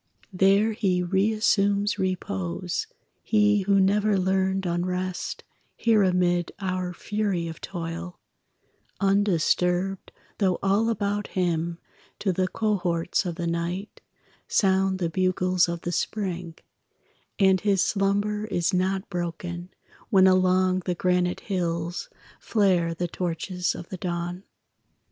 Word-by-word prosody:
There 195 +4 +4
he 190 -5 0
reassumes 205 +1 +2
repose, 180 - -2 0.3
He 210 -1 +3
who 195 +1 +3
never 205 +2 +3
learned 190 0 +1
unrest 180 +1 -2 0.3
Here 225 -2 +3
amid 180 -2 +2
our 185 -2 -2
fury 200 -2 -2
of 160 -1 -8
toil, 170 0 -6 0.8
Undisturbed 195 -1 +1 0.3
though 190 -3 +2
all 200 +4 +2
about 205 -2 -1
him 170 -2 0 0.4
To 195 -3 0
the 185 +1 +1
cohorts 185 -4 0
of 170 - -3
the 170 -1 -3
night 170 +4 -3 0.5
Sound 190 -1 +2
the 175 -2 -1
bugles 185 0 +2
of 170 -1 -4
the 175 - -3
spring; 180 -2 -3 0.8
And 190 -2 +4
his 200 -2 +2
slumber 205 +1 0
is 175 -2 0
not 190 +2 0
broken 175 0 -4 0.4
When 190 -2 +5
along 185 0 +3
the 180 - -1
granite 180 0 +1
hills 170 -3 -2 0.3
Flare 180 -6 +1
the 175 +1 -2
torches 180 +1 -2
of 170 - -9
the 190 - -5
dawn. 175 +1 -4
185 Hz, 115 wpm, -25 LUFS, 175-200 Hz, 0.8 s, When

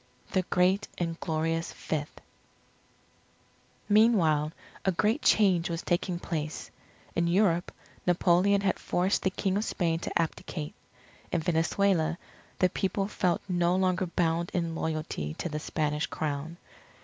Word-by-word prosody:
THE 185 - +2
GREAT 185 +3 +2
AND 165 -1 -2
GLORIOUS 165 0 -1
FIFTH 150 -2 -4 1.7
Meanwhile, 190 -9 +4 0.3
a 190 - +3
great 210 - +1
change 185 -5 +4
was 165 -1 -3
taking 175 0 0
place. 155 -3 -4 0.4
In 170 0 +2
Europe, 175 -1 +2 0.4
Napoleon 180 +3 +4
had 200 - 0
forced 185 +3 +1
the 190 - +2
King 195 0 -1
of 210 - 0
Spain 165 -6 0
to - - -2
abdicate. 160 -2 -3 0.6
In 175 - +1
Venezuela 170 0 +1 0.4
the 185 - +3
people 195 +1 -1
felt 180 -4 0
no 175 -1 +2
longer 185 0 +1
bound 170 0 0
in 170 -2 0
loyalty 155 - -3
to - - -3
the 150 -1 -3
Spanish 150 -1 -1
Crown. 155 +2 -3
175 Hz, 130 wpm, -29 LUFS, 160-185 Hz, 1.7 s, Meanwhile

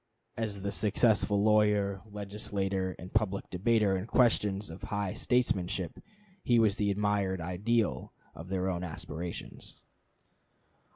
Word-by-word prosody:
As 105 -3 -3
the 100 - -1
successful 105 0 +2
lawyer, 105 -2 +3
legislator, 100 -2 -3
and 90 - -10
public 105 -3 0
debater 105 +1 +2
in 95 +3 -3
questions 105 -6 +2
of 80 - -10
high 100 -2 -2
statesmanship, 95 -7 0 0.4
he 120 -7 +3
was 110 -2 +3
the 105 -1 +1
admired 100 -2 0
ideal 90 - 0 0.2
of 80 - -10
their 95 -1 -1
own 90 -1 -2
aspirations. 85 0 -6
100 Hz, 120 wpm, -30 LUFS, 95-105 Hz, 0.4 s, lawyer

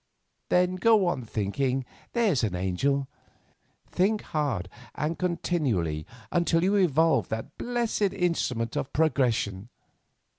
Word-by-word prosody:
"Then 180 +1 +2
go 215 0 +4
on 140 -9 -1
thinking, 125 +5 -1 0.3
there's 210 - +2
an 100 -5 0
angel; 130 +10 0 0.8
think 210 +4 +1
hard 140 - -2 0.3
and 155 +3 -1
continually 135 - -1 0.2
until 170 -1 +2
you 195 +3 +3
evolve 165 -4 +3
that 110 0 -5
blessed 235 -5 0
instrument 165 - -1
of 130 - -2
progression. 120 -9 +1
150 Hz, 110 wpm, -27 LUFS, 115-180 Hz, 0.8 s, go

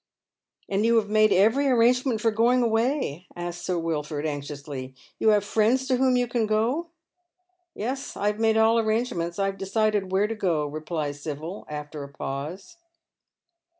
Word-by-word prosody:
" - - -45
And 200 +1 0
you 230 +1 +3
have 215 -3 +2
made 215 0 +4
every 225 +10 +4
arrangement 250 -1 +3
for 230 -1 +2
going 240 +3 +3
away? 225 - 0
" - - -22
asks 175 0 -5
Sir 180 - 0
Wilford, 155 -2 -2
anxiously. 145 -3 -5
" - - -34
You 220 - +4
have 210 -2 +4
friends 225 +5 +1
to 255 -2 +2
whom 260 -1 +3
you 245 0 +1
can 235 -2 0
go? 235 +10 0 0.3
" 360 0 -52
" 365 -1 -47
Yes, 265 +6 -4
I 200 - -2
have 210 +1 0
made 220 -1 +3
all 225 +1 +4
arrangements. 215 -7 -1
I 195 - +1
have 195 -1 -3
decided 200 0 0
where 195 +2 +3
to 220 - -2
go," 175 -8 0
replies 150 -1 -4
Sibyl 155 +6 -6
after 150 0 -6
a 140 - -9
pause. 150 - -6
210 Hz, 185 wpm, -25 LUFS, 165-235 Hz, 0.3 s, made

